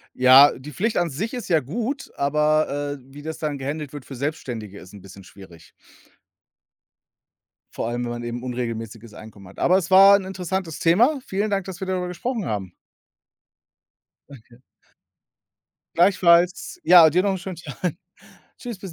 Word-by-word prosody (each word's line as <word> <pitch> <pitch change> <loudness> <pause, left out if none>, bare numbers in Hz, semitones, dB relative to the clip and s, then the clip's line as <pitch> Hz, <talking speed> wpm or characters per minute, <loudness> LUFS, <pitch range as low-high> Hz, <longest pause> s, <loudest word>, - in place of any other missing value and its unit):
Ja, 130 +3 +7
die 145 +3 -11
Pflicht 220 +4 -1
an 175 -1 +1
sich 200 - -5
ist 245 - -6
ja 165 -4 +2
gut, 240 - -5
aber, 145 0 0
äh, - - -21
wie 145 - -10
das 160 +1 -6
dann 150 -2 -3
gehändelt 145 +1 -5
wird 145 -3 -8
für 135 - -9
Selbstständige, 120 -7 -5
ist 90 +2 -15
'n 100 - -12
bisschen 95 0 -14
schwierig. 90 -4 -16 2.0
Vor - - -4
allem, 120 +1 -3
wenn 120 - -4
man 120 0 -6
eben 120 +1 -6
unregelmäßiges 115 -3 -6
Einkommen 105 -3 -13
hat. 95 - -15
Aber 185 +2 +3
es 185 -1 -3
war 195 +1 +8
'n 190 - -7
interessantes 185 -3 -4
Thema. 240 - +3
Vielen 205 +2 -2
Dank, 195 -2 -1
dass 185 -2 -8
wir 190 - -5
darüber 180 -1 -2
gesprochen 220 +4 -4
haben. 95 -4 -4 1.6
Okay. 120 -2 -16 1.3
Gleichfalls. 180 - +3
Ja, 170 -3 +8
dir 180 +4 +2
noch 200 - +1
'n - - -3
schönen 180 0 -8
Tag. 165 +1 -5 0.6
Tschüss, 235 -6 -8
bis 190 -2 -9
155 Hz, 165 wpm, -22 LUFS, 120-185 Hz, 2.0 s, war